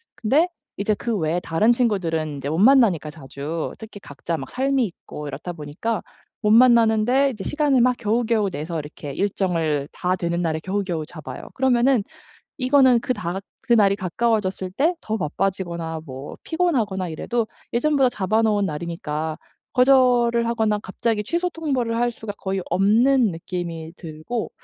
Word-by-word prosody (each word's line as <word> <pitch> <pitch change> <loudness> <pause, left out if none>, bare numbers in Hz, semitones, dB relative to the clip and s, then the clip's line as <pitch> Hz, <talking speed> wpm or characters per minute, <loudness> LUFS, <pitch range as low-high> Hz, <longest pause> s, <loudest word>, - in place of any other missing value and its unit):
근데 285 +10 +2 0.3
이제 205 +1 +1
그 230 +1 -2
외에 165 +1 0
다른 175 +8 +2
친구들은 185 -10 0
인제 140 +1 -4
못 160 - -1
만나니까 205 - +4
자주. 150 +2 -5
특히 220 -2 -10
각자 165 +1 -5
막 135 - -7
삶이 270 0 +1
있고 150 -5 -8
이렇다 165 +5 -6
보니까 165 +9 -3 0.4
못 210 - +1
만나는데 235 +2 +5
이제 210 -5 -7
시간을 290 -4 +2
막 250 0 +3
겨우겨우 220 -2 +1
내서 160 0 -4
이렇게 150 -1 -8
일정을 165 -7 0
다 180 +1 -1
되는 170 0 -2
날에 160 -2 -1
겨우겨우 185 -5 -2
잡아요. 155 -2 -9
그러면은 255 -3 +3 0.6
이거는 255 -2 +5
그 255 - -1
다 175 -5 -4
가 190 - -4 0.2
그날이 210 -5 +4
가까워졌을 190 -1 -1
때 305 - +1
더 220 0 -2
바빠지거나 170 -2 -2
뭐 135 +1 -8
피곤하거나 230 - 0
이래도 225 +8 -2 0.2
예전보다 270 +1 +3
잡아놓은 210 0 +1
날이니까 155 -1 -4 0.3
거절을 245 -3 +4
하거나 220 -3 +1
갑자기 210 +2 -2
취소 340 - 0
통보를 265 -9 -1
할 240 +1 +1
수가 215 -3 -7
거의 190 -1 -2
없는 225 +4 +3
느낌이 165 -1 -5
들고 165 +8 -5
205 Hz, 350 characters per minute, -23 LUFS, 170-240 Hz, 0.6 s, 만나는데